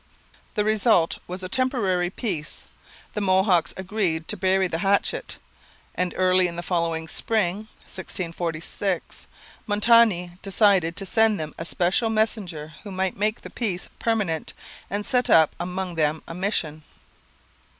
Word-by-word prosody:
The 210 -2 +1
result 215 -5 +3
was 185 +1 -4
a - - -3
temporary 195 -7 +1
peace; 180 -7 -3 0.5
the 210 - -2
Mohawks 190 -2 +3
agreed 185 -4 -1
to - - 0
bury 190 0 +2
the 165 -2 -3
hatchet; 200 +2 0 0.6
and 180 -1 -2
early 185 0 +4
in 170 - -6
the 175 - -5
following 165 -2 -1
spring 210 +2 0 0.2
(1646) 175 0 -4 0.4
Montmagny 205 -5 +3
decided 195 -4 +3
to 195 - -2
send 220 +1 +3
to 160 - -3
them 155 - -9
a 165 - -4
special 185 +7 +1
messenger 200 -8 -1
who 205 - -9
might 190 0 -1
make 215 +2 -1
the - - -10
peace 195 -7 -2
permanent 205 -9 -1 0.4
and 205 +2 -2
set 250 -1 +2
up 160 -2 +5
among 180 +1 -3
them 155 -1 0
a - - -6
mission. 170 -5 -1
185 Hz, 140 wpm, -24 LUFS, 170-210 Hz, 0.6 s, up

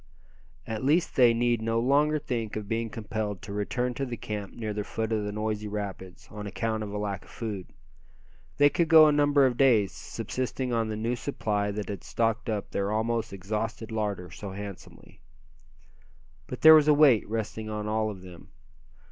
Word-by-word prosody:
At 110 0 -4
least 155 +6 +2
they 125 -3 +6
need 120 0 +1
no 115 +1 0
longer 145 +5 +3
think 115 -7 -3
of 105 -1 -5
being 115 +1 -2
compelled 105 -2 -4
to 100 - -7
return 125 +5 -1
to 135 - -4
the 120 -3 -4
camp 105 -3 -5
near 110 -3 -4
the 105 0 -3
foot 110 +1 -3
of 110 -1 0
the 105 - -3
noisy 105 0 -3
rapids, 100 -3 -6
on 105 -1 -6
account 110 +1 -2
of 105 -1 -5
a 105 - -4
lack 100 -2 -3
of - - -19
food. 105 -5 -5 0.9
They 145 - +6
could 165 +3 +1
go 160 -1 +9
a - - +4
number 145 -1 +4
of 125 -2 +1
days, 115 -8 +4
subsisting 130 0 -4
on 115 -1 +1
the 110 - -3
new 115 +3 -1
supply 105 -6 -2
that 105 0 -4
had 100 -4 -5
stocked 115 0 -1
up 105 -2 -3
their 100 +1 -1
almost 115 +1 -1
exhausted 105 +3 -4
larder 100 -5 -3
so 100 +1 -7
handsomely. 100 -1 -10 1.3
But 125 - -7
there 160 0 +10
was 155 -1 +6
a 150 - +6
weight 140 -9 +5
resting 110 0 -4
on 105 0 -4
all 110 0 0
of 95 -3 -8
them. 90 -2 -12
110 Hz, 190 wpm, -27 LUFS, 105-120 Hz, 1.3 s, there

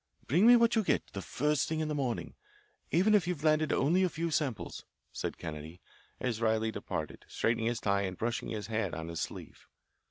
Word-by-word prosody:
"Bring 175 - +4
me 245 - +10
what 235 0 +4
you 220 - +3
get, - - +1
the 100 - -4
first 150 - 0
thing 160 0 -1
in 155 - -1
the 150 - -2
morning, 130 -5 -2 0.6
even 190 +6 +3
if 195 -5 +4
you've 175 -5 -2
landed 155 -1 +3
only 165 +8 +3
a 185 - +3
few 165 +1 -2
samples," 140 -7 -2 0.3
said - - -4
Kennedy, 80 +2 -7 0.4
as 120 -3 -2
Riley 110 0 +2
departed, - - -5
straightening 115 0 0
his 120 0 0
tie 100 -2 +1
and 95 -2 -3
brushing 120 +1 -2
his 110 -3 -4
hat 110 -3 -2
on 80 +1 -5
his 85 -1 -4
sleeve. - - -7
125 Hz, 200 wpm, -31 LUFS, 110-160 Hz, 0.6 s, me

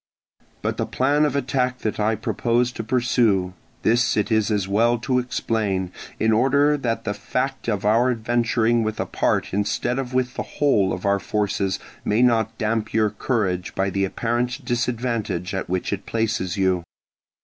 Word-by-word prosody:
But - - -1
the - - -1
plan 145 +4 +2
of 145 -2 -1
attack 130 -2 0
that 110 - -2
I 110 +1 +2
propose 120 +3 0
to 115 - -5
pursue, 110 -6 +2 0.3
this 120 +1 +3
it 105 +2 0
is 110 -1 +2
as 105 -3 0
well 115 +4 +3
to 125 +2 0
explain, 105 -7 -1 0.3
in 110 - +3
order 140 +5 +3
that 120 -5 -2
the 105 - -2
fact 125 +6 -3
of 105 -2 -1
our 115 +4 +4
adventuring 115 0 +1
with 110 0 -2
a - - 0
part - - 0
instead 105 +5 0
of 130 -2 -4
with 125 -1 +1
the - - -3 0.2
whole 105 -10 +3
of 90 - -4
our 100 0 +3
forces 100 -3 -1 0.3
may 110 +4 +2
not 115 -2 +2
damp 110 0 -1
your 110 -2 +3
courage 95 -7 -1
by 95 0 0
the 100 0 0
apparent 120 +6 -1
disadvantage 120 -7 -1
at 95 -2 -3
which 90 +2 -1
it 100 0 -5
places 110 -6 -1
you. 95 -2 +1
115 Hz, 170 wpm, -23 LUFS, 100-125 Hz, 0.3 s, our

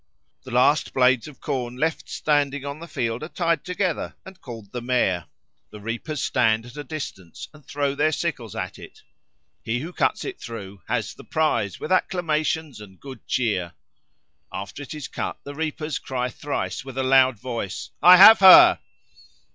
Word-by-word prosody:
The - - -9
last 125 +5 +2
blades 130 -1 +3
of 150 - -13
corn 125 -4 -4
left 160 +4 -2
standing 145 -2 0
on 140 +1 -6
the 170 - -9
field 120 -6 -3
are 155 - -6
tied 170 -4 -1
together 180 -2 -2
and 190 -1 -13
called 115 -5 -10
the 125 - -5
Mare. 100 -10 0 0.4
The 105 - -11
reapers 120 +8 -4
stand 110 -1 +1
at 120 - -13
a 145 - -6
distance 130 - -8
and 150 -1 -17
throw 140 -1 -2
their 150 +2 +1
sickles 140 - -4
at 95 -1 -5
it; - - -14 0.6
he 120 +2 -2
who 170 +4 -7
cuts - - 0
it 385 - -6
through 100 -5 -8
"has - - -2
the - - -14
prize, 115 - -1
with - - -6
acclamations 160 - -1
and 95 -3 -14
good 130 -4 -11
cheer." 100 -8 -1 0.8
After 100 +8 -7
it 145 +2 -8
is 150 -4 -6
cut - - -5
the 145 - -8
reapers 155 -1 -3
cry 125 -1 -3
thrice 145 +1 -4
with 135 -1 -10
a 135 - 0
loud 130 -2 +4
voice, 115 -5 -5
"I 180 +1 +9
have 220 +4 +10
her!" 190 -1 +9
135 Hz, 175 wpm, -23 LUFS, 115-155 Hz, 0.8 s, have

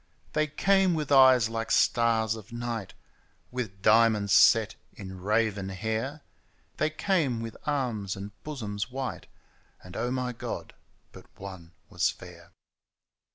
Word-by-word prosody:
They 155 0 +1
came 190 +4 +2
with 150 -2 -3
eyes 130 -4 +7
like 115 0 -4
stars 115 -2 +2
at 110 +1 -12
night, 120 -4 -5 0.6
With 110 -6 -5
diamonds 110 -2 +4
set - - +5 0.2
in 95 -2 -9
raven 105 -1 0
hair, 110 +9 -3 0.5
They 155 - +1
came 155 - 0
with 115 -1 -6
arms 120 -10 -1
and 100 +1 -7
bosoms 110 -8 -4
white 130 0 -5 0.3
— - - -32
And, 90 0 -12
Oh 120 +2 -1
my 125 -1 -2
Qod! 115 - -6 0.4
but - - -14
one 95 -4 -9
was - - +1
fair - - -11
115 Hz, 135 wpm, -28 LUFS, 105-130 Hz, 0.6 s, eyes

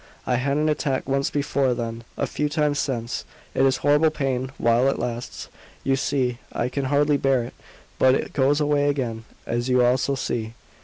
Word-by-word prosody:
I 125 - +1
had 140 +3 0
an 155 +1 +1
attack 145 -4 0
once 135 0 +1
before 140 -3 0
then 115 -1 -4
a - - 0
few 150 0 -2
times 150 -2 +1
since. 120 -4 -2 0.3
It - - +1
is 130 - +2
horrible 150 +2 +5
pain 130 -3 -2
while 120 +3 +3
it - - -1
lasts, 120 0 -4 0.4
you 135 - +2
see; 130 -3 0
I 120 - -1
can 135 +1 -2
hardly 145 +1 +3
bear 135 -3 +2
it. 120 - -8 0.5
But 130 0 +5
it - - -3
goes 140 +2 +3
away 145 -1 +2
again, 120 -6 -2 0.2
as 120 +2 -2
you 125 -1 +4
also 130 +3 +2
see. 115 -3 -3
135 Hz, 190 wpm, -24 LUFS, 125-145 Hz, 0.5 s, horrible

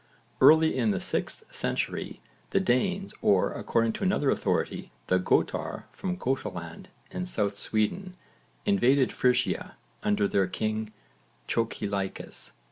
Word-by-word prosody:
Early 160 0 +7
in 120 -4 +2
the 100 - +1
6th - - -2
century - - -2 0.3
the - - +2
Danes 190 +11 0
or, 95 -2 +3
according 115 -1 +1
to - - -5
another 185 -7 +2
authority, - - -1
the 95 - +2
Götar 90 - 0
from 185 -2 -4
Götaland 90 - -3 0.3
in 180 - -3
south 105 - 0
Sweden, 180 - -1 0.5
invaded 140 -10 +3
Frisia 125 -1 +1 0.2
under 105 0 +2
their 95 -1 +2
king 110 0 -2 0.6
Chocilaicus. 100 -4 -2
115 Hz, 120 wpm, -28 LUFS, 105-160 Hz, 0.6 s, Early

